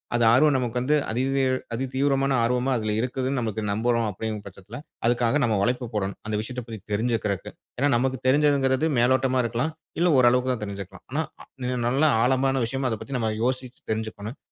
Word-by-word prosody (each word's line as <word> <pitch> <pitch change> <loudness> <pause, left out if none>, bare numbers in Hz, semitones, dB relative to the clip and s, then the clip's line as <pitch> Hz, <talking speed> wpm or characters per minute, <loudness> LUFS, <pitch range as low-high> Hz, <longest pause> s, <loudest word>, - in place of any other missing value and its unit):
அது 120 - +2
ஆர்வம் 145 +3 +5
நமக்கு 125 -2 -1
வந்து 145 +5 +2 0.2
அதிதீ 135 +3 +1 0.3
அதி 130 +3 -1
தீவிரமான 135 0 +2
ஆர்வமா 125 +2 +1
அதில 110 -2 -1
இருக்குதுனு 130 +2 -1
நம்ளுக்கு 110 -2 -2
நம்புறோம் 115 +1 +1
அப்படின்கிற 105 +1 -4
பட்சத்தில 100 +4 -10 0.3
அதுக்காக 120 +3 +2
நம்ம 115 -3 +2
உழைப்ப 125 0 -1
போடணும், 100 -1 -2
அந்த 110 - -1
விஷயத்தைப் 125 +1 -6
பத்தி 110 -2 -7
தெரிஞ்சிக்குறக்கு. 110 -3 -1 0.3
ஏன்னா 140 +3 +2
நமக்கு 130 +1 0
தெரிஞ்சதுங்கிறது 140 +1 +3
மேலோட்டமா 130 +1 +3
இருக்கலாம், 120 +8 -1 0.3
இல்லை 175 0 +4
ஓரளவுக்கு 125 +1 +4
தான் 110 - -5
தெரிஞ்சுக்கலாம். 100 -1 -8
ஆனா 155 +4 0 0.2
அ - - -12 0.2
இன்னும் 125 -1 -1
நல்லா 145 +5 +3
ஆழமான 135 +1 +2
விஷயமா 135 +2 -1
அத 110 - -1
பத்தி 135 -2 -4
நம்ம 110 -2 0
யோசிச்சு 130 0 -2
தெரிஞ்சிக்கணும். 110 +2 -4
125 Hz, 175 wpm, -25 LUFS, 110-135 Hz, 0.3 s, ஆர்வம்